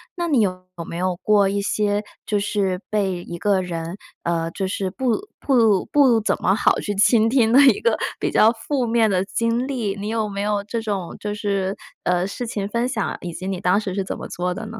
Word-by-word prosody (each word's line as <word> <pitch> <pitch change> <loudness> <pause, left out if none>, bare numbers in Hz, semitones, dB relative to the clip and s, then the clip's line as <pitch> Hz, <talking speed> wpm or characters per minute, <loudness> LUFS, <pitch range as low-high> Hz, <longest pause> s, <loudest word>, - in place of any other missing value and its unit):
那 345 -1 -2
你 280 -8 +3
有 185 -3 -1 0.2
没 170 - -6
有 185 0 0
过 210 -2 +4
一 200 +1 -1
些 205 0 0 0.2
就 210 - 0
是 195 -3 -1
被 190 -4 -1
一 170 - -7
个 195 +1 +1
人， 170 0 -5 0.3
呃， 165 -1 -1
就 190 +2 -3
是 190 0 -2
不 260 - -1
不 225 -8 +3
不 265 -6 +4
怎 215 - 0
么 190 - +3
好 205 - +3
去 205 - -3
倾 220 +2 +4
听 235 -3 +3
的 270 - +8
一 275 - +5
个 475 +3 +2 0.2
比 - - 0
较 220 - +5
负 245 +3 -2
面 230 -1 +3
的 185 -2 +1
经 230 +4 0
历？ 230 -8 -2
你 205 +1 -5
有 220 -1 -1
没 200 0 -4
有 205 0 0
这 230 +3 -3
种 200 -5 -3
就 210 0 -3
是， 200 -2 -1 0.3
呃， 180 +1 +1
事 245 +5 -5
情 205 -4 -3
分 235 +4 -1
享， 240 -5 -2
以 175 - -5
及 185 +3 -6
你 190 -2 -2
当 180 +3 +3
时 195 -4 -4
是 195 - 0
怎 - - -4
么 - - -7
做 180 +1 -2
的 220 - -6
呢？ 225 +1 -8
205 Hz, 245 characters per minute, -22 LUFS, 190-230 Hz, 0.3 s, 的